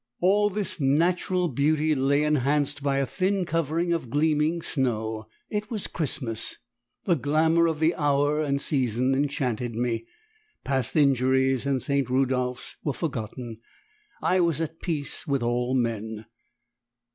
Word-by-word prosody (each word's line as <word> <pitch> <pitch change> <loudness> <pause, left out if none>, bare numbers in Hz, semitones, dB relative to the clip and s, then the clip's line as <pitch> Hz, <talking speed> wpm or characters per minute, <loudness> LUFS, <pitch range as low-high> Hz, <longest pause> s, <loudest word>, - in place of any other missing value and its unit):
All 205 +3 +3
this 190 -2 -3
natural 175 +5 +2
beauty 155 +2 +1
lay 140 +1 +2
enhanced 145 0 +1
by 140 -1 0
a 140 - +1
thin 185 - 0
covering 165 +2 0
of 160 -8 -3
gleaming 155 +4 +1
snow. 110 -5 0 0.2
It 210 +1 -2
was 220 -5 -3
Christmas! 125 -8 -2 0.5
The 180 - +2
glamour 160 +3 +2
of 160 -2 -2
the 160 +2 +3
hour 145 0 +1
and 140 -2 0
season 130 -2 +1
enchanted 125 -4 -1
me; 115 -1 -2 0.6
past 135 -4 -1
injuries 130 -2 +3
and 135 -2 0
St. 140 -1 0
Rudolphs 125 -1 -1
were 145 - -1
forgotten; 120 -6 -5 0.6
I 185 - +3
was 170 -4 +1
at 165 0 -4
peace 160 -1 -2
with 140 -4 0
all 120 +2 0
men. 110 -3 -2
140 Hz, 135 wpm, -26 LUFS, 125-160 Hz, 0.6 s, All